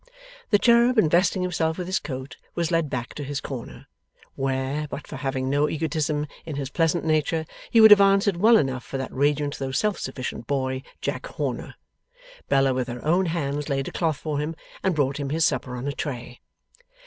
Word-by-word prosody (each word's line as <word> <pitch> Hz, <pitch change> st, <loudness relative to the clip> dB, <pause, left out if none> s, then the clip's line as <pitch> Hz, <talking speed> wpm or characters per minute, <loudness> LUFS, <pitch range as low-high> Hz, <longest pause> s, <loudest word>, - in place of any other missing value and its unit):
The 205 Hz, -, +5 dB
cherub 235 Hz, +2 st, +4 dB
investing 180 Hz, +1 st, +3 dB
himself 160 Hz, -3 st, 0 dB
with 180 Hz, -, -3 dB
his 185 Hz, +1 st, 0 dB
coat 130 Hz, -2 st, -7 dB, 0.2 s
was 170 Hz, -1 st, -1 dB
led 165 Hz, -3 st, +1 dB
back 125 Hz, -2 st, -4 dB
to 145 Hz, -, -6 dB
his 140 Hz, 0 st, -3 dB
corner 130 Hz, -6 st, -7 dB, 0.5 s
where, 135 Hz, +2 st, -2 dB
but 145 Hz, -, -7 dB
for -, -, -8 dB
having 130 Hz, -2 st, -2 dB
no 145 Hz, +2 st, +2 dB
egotism 155 Hz, -1 st, -1 dB, 0.2 s
in 155 Hz, -3 st, -6 dB
his 140 Hz, -1 st, -4 dB
pleasant 165 Hz, +1 st, +1 dB
nature, 160 Hz, 0 st, +1 dB, 0.2 s
he 230 Hz, -, +4 dB
would 220 Hz, -1 st, +9 dB
have 205 Hz, -1 st, +10 dB
answered 195 Hz, -1 st, +4 dB
well 225 Hz, +5 st, +6 dB
enough 130 Hz, -3 st, -1 dB
for 135 Hz, -, -5 dB
that 130 Hz, -, -5 dB
radiant 145 Hz, +1 st, 0 dB
though 135 Hz, -1 st, -2 dB
self 210 Hz, +9 st, 0 dB
sufficient 130 Hz, -3 st, -5 dB
boy, 130 Hz, -2 st, -1 dB, 0.2 s
Jack -, -, -3 dB
Horner -, -, -4 dB, 0.7 s
Bella 135 Hz, -1 st, +3 dB
with 130 Hz, -1 st, -1 dB
her 120 Hz, +1 st, -7 dB
own 175 Hz, +4 st, +3 dB
hands 150 Hz, -3 st, -2 dB
laid 135 Hz, -1 st, -1 dB
a -, -, -11 dB
cloth 160 Hz, -4 st, 0 dB
for 150 Hz, -2 st, -3 dB
him, 155 Hz, +2 st, -3 dB, 0.3 s
and 190 Hz, -3 st, +1 dB
brought 140 Hz, -1 st, +1 dB
him 140 Hz, -1 st, -3 dB
his 160 Hz, +2 st, +2 dB
supper 125 Hz, -2 st, -1 dB
on 125 Hz, +3 st, -4 dB
a -, -, 0 dB
tray. 125 Hz, -4 st, -6 dB
150 Hz, 195 wpm, -25 LUFS, 135-170 Hz, 0.7 s, have